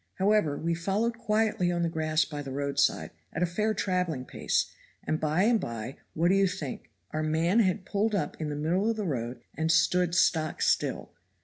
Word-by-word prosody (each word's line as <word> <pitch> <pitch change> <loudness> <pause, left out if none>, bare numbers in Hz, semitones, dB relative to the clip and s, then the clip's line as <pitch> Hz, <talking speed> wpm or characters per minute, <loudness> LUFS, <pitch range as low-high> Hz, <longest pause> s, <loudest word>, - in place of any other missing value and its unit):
However 190 -7 +2
we 170 +2 -1
followed 205 +7 -1
quietly 215 -5 +1
on 175 -1 0
the - - +2
grass 155 -1 +1
by 145 -1 -6
the 135 -2 -7
road 140 +1 -2
side - - +2 0.2
at 165 - 0
a - - +5
fair 215 +5 0
traveling 180 -9 -1
pace, - - -1 0.3
and 155 - -1
by 155 +4 +1
and 230 +1 +4
by 115 - -5 0.2
what 170 +2 +2
do - - +4
you 195 0 +4
think? 180 -8 -5 0.2
Our 155 - -2
man 160 +7 +2
had 185 -3 +1
pulled 210 +2 0
up 195 - -1
in 155 - -2
the 145 - -3
middle 175 +8 +1
of 225 - -1
the 210 - -2
road 120 -5 -3
and 160 +2 +1
stood 180 0 +3
stock 160 -3 +2
still. - - 0
170 Hz, 205 wpm, -28 LUFS, 155-195 Hz, 0.3 s, a